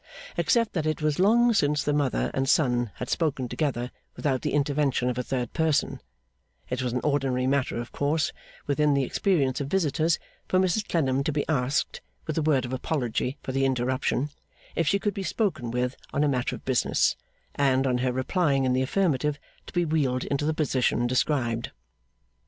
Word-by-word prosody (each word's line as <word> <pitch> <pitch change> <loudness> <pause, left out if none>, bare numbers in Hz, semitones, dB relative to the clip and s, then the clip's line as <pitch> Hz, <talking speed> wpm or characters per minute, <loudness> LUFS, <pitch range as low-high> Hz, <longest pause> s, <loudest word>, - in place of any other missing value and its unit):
Except 230 -3 +2
that 160 -3 -1
it 155 0 -1
was 155 0 +1
long 235 +5 +5
since 150 -7 +2
the 145 - 0
mother 145 -3 0
and 135 0 0
son 120 -6 +2
had 125 - -5
spoken 140 -5 0
together 125 -3 -2 0.2
without 135 -4 0
the - - -1
intervention 140 -3 +1
of 125 - -6
a - - +2
third 125 -1 -3
person, 160 -3 +1 0.7
it 125 0 -1
was 125 -1 -1
an 125 +1 -1
ordinary 135 -3 +1
matter 135 -2 +1
of 120 - -6
course 145 +2 0 0.3
within 145 0 +2
the 140 - +2
experience 140 -3 +1
of 140 - -3
visitors 165 -1 +1 0.3
for 185 - +2
Mrs 190 +3 +1
Clennam 135 -5 +1
to 155 - 0
be 145 0 -1
asked, 140 -2 0 0.2
with 155 - -3
a 160 - +1
word 145 -4 +2
of 120 - -5
apology 130 -1 -1
for - - -4
the 135 +1 0
interruption, 130 +2 0 0.4
if 165 - +1
she 195 - +4
could 205 +1 -1
be 195 - -4
spoken 185 - -1
with 125 +2 -1 0.2
on 145 - +1
a - - +3
matter 130 -3 0
of - - -13
business, 130 -2 +2 0.4
and, 135 -1 +2
on 125 -2 +1
her 125 0 +1
replying 135 +1 +1
in 130 - +2
the 130 - +2
affirmative, 150 -2 +1 0.3
to - - -10
be 175 -1 +1
wheeled 140 -5 0
into 145 +1 -1
the 160 - +2
position 130 -5 +1
described. 120 -2 0
140 Hz, 190 wpm, -26 LUFS, 130-155 Hz, 0.7 s, long